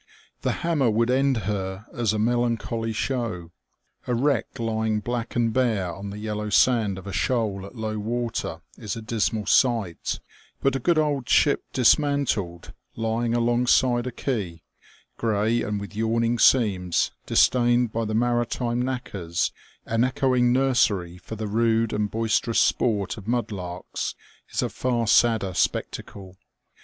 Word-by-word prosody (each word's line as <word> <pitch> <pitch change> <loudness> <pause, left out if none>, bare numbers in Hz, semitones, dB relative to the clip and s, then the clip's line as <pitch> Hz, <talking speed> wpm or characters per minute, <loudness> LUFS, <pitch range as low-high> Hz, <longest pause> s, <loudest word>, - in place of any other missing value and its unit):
The - - 0
hammer 150 -8 +2
would 115 +3 +2
end 135 0 +2
her 95 -1 -3
as 120 -4 0
a 110 - -1
melancholy 115 0 0
show. 110 -7 -3 0.6
A 125 - +1
wreck 140 +4 0
lying 110 -1 -1
black 120 +1 -4
and 115 -2 +1
bare 110 -9 +1
on 100 +2 -7
the 100 - -7
yellow 105 0 -4
sand 105 -2 +3
of 95 - -10
a 100 - -6
shoal 105 -6 -1
at 110 - -14
low 110 -1 -3
water 115 +2 -3 0.2
is 105 -3 -4
a 115 - -6
dismal 110 -1 -1
sight; 115 -10 +1 0.4
but 135 -1 +1
a - - 0
good 170 +6 +2
old 145 -5 0
ship 145 - +3
dismantled, 125 - +1 0.2
lying 115 +1 -1
alongside 120 +1 +2
a - - -3
quay, 100 - -3 0.5
grey 110 +1 +1
and 105 -1 -2
with 100 +1 -8
yawning 115 +2 0
seams, 95 -10 +3 0.2
disdained 120 -1 +3
by 115 - -1
the 110 0 -2
maritime 120 +1 0
knackers, 105 -10 -2 0.3
an 115 +1 +1
echoing 125 -1 +2
nursery 110 -9 +1
for 110 - -8
the 110 0 -4
rude 115 +1 +1
and 105 0 0
boisterous 115 +1 +1
sport 105 -3 +1
of 105 -1 -10
mudlarks, 100 -7 -3 0.3
is - - -1
a - - -1
far 120 -2 -1
sadder 110 -3 +3
spectacle. 95 +1 -3
115 Hz, 145 wpm, -25 LUFS, 105-120 Hz, 0.6 s, sand